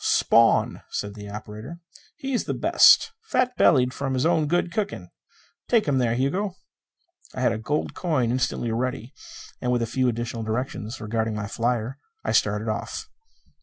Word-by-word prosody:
"Spawn," 115 0 +3
said 105 0 -4
the 105 -1 -9
operator. 110 +8 -8 0.4
"He 270 0 -4
is 245 - 0
the - - -2
best. 450 - +6 0.2
Fat 250 - +1
bellied 125 -2 +4
from 135 -1 -2
his 130 - +1
own 160 -3 +2
good 175 +2 +1
cooking. 200 - -3 0.6
Take 230 -6 +3
him 135 -2 +2
there, 120 -2 +1
Hugo." 180 +10 -1 0.8
I - - -3
had - - +3
a 110 - -3
gold 145 +7 -2
coin 145 -10 0
instantly 125 -2 -1
ready; 125 +1 -3 0.5
and 125 - 0
with 120 -1 +1
a - - +1
few 130 +3 0
additional 120 0 -3
directions 110 +1 -3
regarding 110 0 -2
my 105 -1 -3
flyer, 120 +3 -2 0.2
I - - -1
started 105 +1 +1
off. 115 - -4
125 Hz, 165 wpm, -25 LUFS, 110-145 Hz, 0.8 s, best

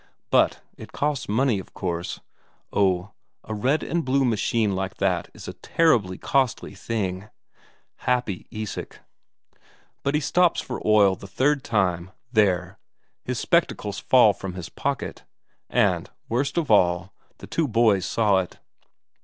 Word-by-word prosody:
But - - +3 0.2
it - - -11
costs 145 -5 -1
money, 115 0 +2
of 95 - -12
course 85 -1 -3 0.5
oh, 95 -1 +1 0.3
a 110 - -6
red 130 +9 +1
and 170 0 -1
blue 135 0 +2
machine 110 -2 +1
like 95 +1 -3
that 90 -4 0
is - - -10
a - - -5
terribly 115 - +1
costly 130 -7 0
thing! 100 -1 -3 0.7
Happy 125 -7 -1
Isak! 110 -1 -6 1.0
But 140 +1 0
as - - +4
he - - -2
stops 175 +4 +3
for 125 - -5
oil 105 -3 +5
the 100 - -11
third 140 +6 +1
time, 95 -5 0 0.2
there! 95 -5 +1 0.4
his - - -3
spectacles 105 -1 0
fall 110 -1 +5
from 95 -2 -7
his 90 -2 -6
pocket. 140 -2 -3 0.5
And, - - +1 0.2
worst 140 +7 -1
of 160 -8 0
all, 90 -2 +3 0.2
the - - -10
two 165 -2 0
boys 110 -5 +3
saw 105 -4 +2
it. 90 - -5
105 Hz, 145 wpm, -24 LUFS, 95-130 Hz, 1.0 s, oil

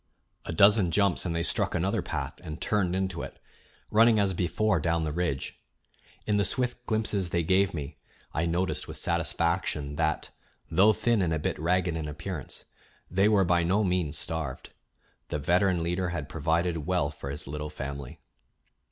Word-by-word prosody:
A - - -4
dozen 100 +2 +5
jumps 100 +1 +2
and 85 - -2
they 85 - 0
struck - - 0
another - - +1
path - - -4
and 80 0 -6
turned 95 -4 +1
into 95 -2 -1
it, - - -7 0.5
running 115 +1 +6
as 100 -2 +2
before 90 +3 +1
down 85 +1 +1
the 75 - -1
ridge. 75 -4 -2 0.7
In 105 -1 +2
the 100 - +3
swift 125 +2 -1
glimpses 110 -4 0
they 85 0 0
gave 95 +3 +3
me 75 0 -6 0.4
I 85 +2 0
noticed 90 +3 -1
with - - -6
satisfaction 85 -3 -1
that, 80 -1 0 0.4
though 95 +6 +6
thin 115 0 +1
and 85 -3 +1
a - - 0
bit 75 - -2
ragged 90 +1 +1
in 80 -2 -3
appearance, 75 0 -6 0.5
they 95 +4 +4
were 100 -3 +4
by 85 0 +3
no 95 +6 +2
means 90 -5 0
starved. 75 -3 -4 0.6
The - - -2
veteran 90 +3 +2
leader 90 +2 -1
had 85 - -4
provided 80 -1 0
well 90 -6 +1
for 70 -2 -7
his 70 +2 -4
little 75 +2 -5
family. 70 0 -6
85 Hz, 170 wpm, -28 LUFS, 80-95 Hz, 0.7 s, running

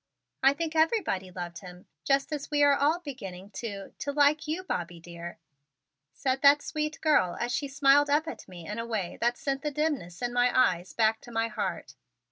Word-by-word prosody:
"I 270 +1 +6
think 325 0 -3
everybody 315 - +1
loved 175 -1 -6
him 180 -2 -12 0.2
just 275 +2 +1
as 290 -2 -4
we 295 -1 +3
are 285 0 +6
all 295 +4 +2
beginning 200 - -8
to 200 -4 -6
to 285 - -2
like 290 +1 +3
you, 325 +5 -2
Bobby 175 - -4
dear," 170 0 -9 0.7
said 260 - -1
that 285 0 +6
sweet 305 -1 -3
girl 295 - +3
as 240 +1 -1
she 280 - -1
smiled 280 +1 +4
up 300 +3 +2
at - - -7
me 175 -3 -10
in 210 +2 -4
a 230 - -3
way 210 -6 -3
that 240 +1 +1
sent 275 -1 -2
the 300 - -1
dimness 280 - -2
in 240 0 -1
my 245 0 +4
eyes 180 -7 +2
back 220 -1 +2
to 240 - -12
my 225 0 0
heart. 185 -9 -4
255 Hz, 200 wpm, -28 LUFS, 190-290 Hz, 0.7 s, I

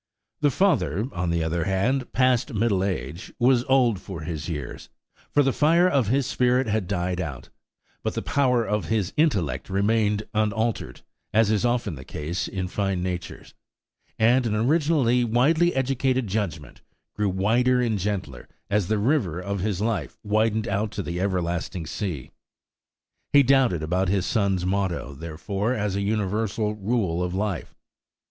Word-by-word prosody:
The 145 - +3
father, 115 - +1
on 90 -3 -2
the 85 -1 0
other 80 +1 -1
hand, 115 +7 0
past 130 0 +2
middle 100 -3 +1
age, 85 - -4
was 125 0 +3
old 125 -6 +3
for 95 -3 -8
his 80 0 -5
years, 75 -6 -6 0.4
for 145 - +3
the 135 -1 +1
fire 170 +4 +4
of 135 - +2
his 135 +4 +2
spirit 125 0 +2
had 110 -4 -1
died 90 -1 -1
out; 70 -7 -6 0.5
but - - -3
the - - -2
power 125 -4 +2
of 105 0 -1
his 105 -5 -1
intellect 100 - 0
remained 105 +1 +1
unaltered, 110 +1 -1 0.3
as 110 -1 +4
is 110 +2 +1
often 120 -5 0
the 65 -3 -9
case 75 +6 -4
in 95 -1 -3
fine 95 -1 -1
natures; 90 -1 -5 0.6
and 120 +2 +3
an 105 - 0
originally 130 0 +2
widely 150 +9 +3
educated 130 -1 +1
judgment 95 -7 -4 0.3
grew 105 -1 0
wider 115 +7 +2
and 115 -4 0
gentler 90 -10 -4 0.2
as 100 -3 +2
the 110 - +1
river 105 - +1
of 100 +2 -3
his 100 0 -1
life 115 -1 -2
widened 110 +1 +1
out 100 +2 -1
to 100 - -3
the 85 +1 -3
everlasting 90 -2 -2
sea. 85 - -4 1.0
He 140 -1 +7
doubted 130 - +3
about 90 +4 0
his 95 -1 +1
son's 95 -4 0
motto, 95 -7 -1
therefore, 95 - -3
as 105 -4 -1
a 100 - -1
universal 105 +1 -1
rule 100 -5 -1
of 90 0 -2
life. 100 -4 -3
105 Hz, 155 wpm, -25 LUFS, 90-120 Hz, 1.0 s, He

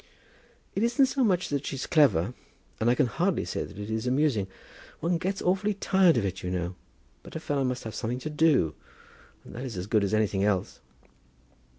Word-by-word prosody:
"It 195 - -1
isn't 240 +4 +4
so 265 0 0
much 185 -5 +2
that 140 -1 -1
she's 135 -2 -4
clever, 120 - +3 0.5
and 110 - +2
I 120 - +4
can 145 - +3
hardly 115 - 0
say - - -3
that - - -13
it 105 +1 -5
is 110 +2 -2
amusing. 130 -6 +2 0.5
One 170 0 0
gets 190 +3 -2
awfully 195 +3 +1
tired 190 -6 +4
of 110 - +1
it, 95 -1 -3
you 90 - -3
know. 90 0 -2 0.5
But - - -13
a - - -2
fellow 145 -3 -1
must 125 -1 -2
have 110 - -6
something 120 +1 -2
to 155 - -4
do, 150 - +3 0.7
and - - -12
that 125 - -6
is 120 -7 -5
as 90 - -3
good 105 0 +2
as 100 +2 +1
anything 105 -2 +1
else." 100 -3 0
125 Hz, 205 wpm, -28 LUFS, 105-165 Hz, 0.7 s, isn't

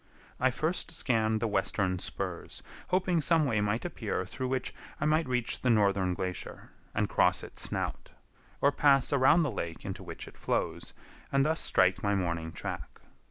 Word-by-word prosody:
I 130 - +4
first 155 +8 -1
scanned 110 -8 +1
the 115 - +1
western 95 -2 0
spurs, - - -5 0.2
hoping 180 -2 +2
some 160 0 +4
way 115 -6 +1
might 105 +6 0
appear 110 - -3
through 130 +7 -4
which 130 0 -2 0.3
I 150 - 0
might 155 0 +2
reach 125 -2 -1
the 130 - +1
northern 100 -5 +3
glacier, 90 0 -5 0.2
and 105 - +1
cross 90 -2 +2
its - - -6
snout; - - -3 0.5
or 140 - +5
pass 140 -2 +4
around 140 +5 +5
the 145 - 0
lake 85 -5 -5
into - - -5
which - - -8
it - - -14
flows, - - -2 0.4
and 140 0 +3
thus 160 +1 +1
strike 95 0 +3
my 100 0 +1
morning 85 -3 -2
track. 80 - -6
115 Hz, 170 wpm, -30 LUFS, 95-140 Hz, 0.5 s, or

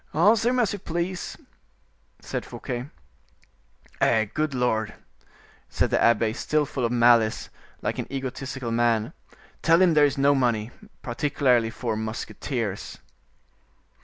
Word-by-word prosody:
"Answer 215 +8 +4
him 255 - 0
as 225 -5 +1
you 205 - -5
please," 175 +1 -4 0.8
said - - -4
Fouquet. 125 +3 -6 1.1
"Eh! 110 -1 +3
good 155 -3 -1
Lord!" 110 -4 0 0.7
said - - 0
the - - +2
abbe, 115 -1 +3
still 150 +5 0
full 130 -2 -4
of 115 - -1
malice, 120 -2 +3 0.3
like - - -2
an - - -5
egotistical 130 -2 -4
man; 115 -2 +1 0.5
"tell 165 +1 +4
him 185 -3 +5
there 150 -1 +6
is 145 0 -1
no 140 +1 +4
money, 120 -4 0 0.3
particularly 125 -2 +1
for 115 0 -3
musketeers." 110 0 -4
125 Hz, 130 wpm, -25 LUFS, 115-150 Hz, 1.1 s, there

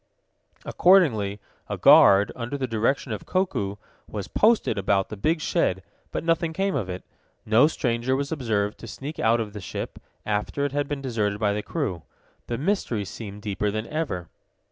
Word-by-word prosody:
Accordingly, 115 - +3 0.3
a - - -2
guard, 100 +1 +7
under 125 +4 -4
the 135 - -1
direction 115 +3 0
of 105 - -5
Koku, 140 - -1 0.3
was 105 -3 -5
posted 225 +1 +3
about 95 0 +1
the 105 - -5
big 155 - 0
shed, 95 -9 0 0.3
but - - -4
nothing 165 0 +1
came 195 +2 0
of 95 - -2
it. 90 0 -5 0.4
No 110 +6 +5
stranger 125 -4 0
was 140 +2 -2
observed 110 -8 -1
to 115 - -9
sneak 140 +7 -7
out 115 +1 +3
of 105 -2 -4
the 105 - -7
ship, - - -6 0.3
after 105 +7 -1
it 145 - -2
had 145 0 -1
been 140 -1 -4
deserted 105 -5 -1
by 105 -2 +2
the 105 - -2
crew. 105 - -3 0.5
The 120 - -2
mystery 135 - -1
seemed 100 0 -8
deeper 105 0 -1
than 110 +2 -3
ever. 150 - -3
115 Hz, 175 wpm, -25 LUFS, 105-145 Hz, 0.5 s, guard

